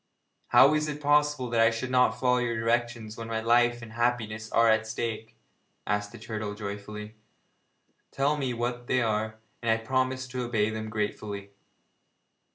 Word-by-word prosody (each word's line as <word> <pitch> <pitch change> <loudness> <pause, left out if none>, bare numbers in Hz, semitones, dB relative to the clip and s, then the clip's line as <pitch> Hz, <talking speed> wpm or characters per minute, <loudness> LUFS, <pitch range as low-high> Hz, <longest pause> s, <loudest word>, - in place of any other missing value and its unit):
'How 140 +3 +7
is 155 0 +1
it 150 -1 -4
possible 150 -2 +2
that 115 -1 +3
I 115 - +6
should 115 +3 -4
not 125 -2 +3
follow 125 -1 +3
your 120 -2 -1
directions 115 -1 -1
when 115 -1 -6
my 115 -1 -2
life 120 +1 +3
and 110 -1 -10
happiness 110 -2 -1
are 115 0 +4
at 110 0 +3
stake?' 110 -1 -4 0.5
asked 105 0 -1
the 120 - -10
turtle 105 -2 -5
joyfully. 105 +1 -7 1.0
'Tell 140 +2 +1
me 135 -4 -2
what 120 +1 -3
they 130 -1 +2
are, 110 0 -1 0.2
and 115 - -1
I 110 - +5
will 115 - -12
promise 130 +1 0
to 130 0 -3
obey 110 -3 0
them 110 0 -5
gratefully.' 105 -1 -4
115 Hz, 170 wpm, -28 LUFS, 110-125 Hz, 1.0 s, How